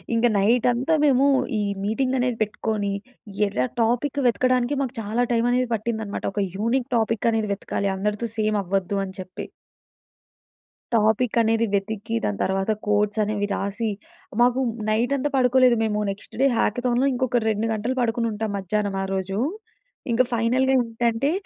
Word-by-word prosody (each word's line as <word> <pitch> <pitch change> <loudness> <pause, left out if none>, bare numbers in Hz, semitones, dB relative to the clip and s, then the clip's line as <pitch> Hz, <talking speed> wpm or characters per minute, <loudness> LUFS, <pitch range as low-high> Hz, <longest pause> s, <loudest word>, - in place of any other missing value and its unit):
ఇంక 230 +1 +2
నైటంతా 245 +7 +2
మేమూ 275 -1 +4 0.3
ఈ - - 0 0.2
మీటింగ్ 255 +5 0
అనేది 245 -2 0
పెట్టుకోని, 210 -1 -1 0.6
ఎరా 125 -10 0 0.2
టాపిక్ 245 +5 0
వెతకడానికే 250 +3 +2
మాకు 265 -2 -2
చాలా 220 +3 0
టైమనేది 245 +2 +2
పట్టిందనమాట. 220 -1 -3
ఒక 205 - -1 0.2
యూనిక్ 235 +5 0
టాపిక్ 225 0 0
అనేది 220 -2 -1
వెతకాలి, 200 0 -2
అందరితో 210 +4 -1
సేమవ్వద్దు 200 -3 0
అని 190 0 -9
చెప్పి. 185 0 -7 1.5
టాపిక్ 220 +2 +2
అనేది 225 0 +2
వెతికి, 205 +2 -2
దాని 100 -2 -1
తరువాత 195 +2 0 0.2
కోడ్స్ 210 +1 +1
అనేవి 205 -1 -1
రాసి, 205 +3 -2 0.5
మాకు 245 +1 +4 0.3
నైటంతా 250 +6 +1
పడుకోలేదు 255 -1 +4
మేము. 210 -1 0
నెక్స్ట్ 195 - -10
డే 275 - +6
హాకథాన్‌లో 245 +4 +1
ఇంకొక 245 -1 0
2 215 +1 0
గంటలు 225 +4 -2
పడుకొనుంటాం 225 -2 -1
మధ్యానం 200 +1 -1
ఆ - - -2
రోజూ. 195 +1 -2 0.7
ఇంక 235 - +3
ఫైనల్‌గా 250 +3 +2
ఏంటంటే, 235 +3 0
225 Hz, 135 wpm, -23 LUFS, 205-245 Hz, 1.5 s, డే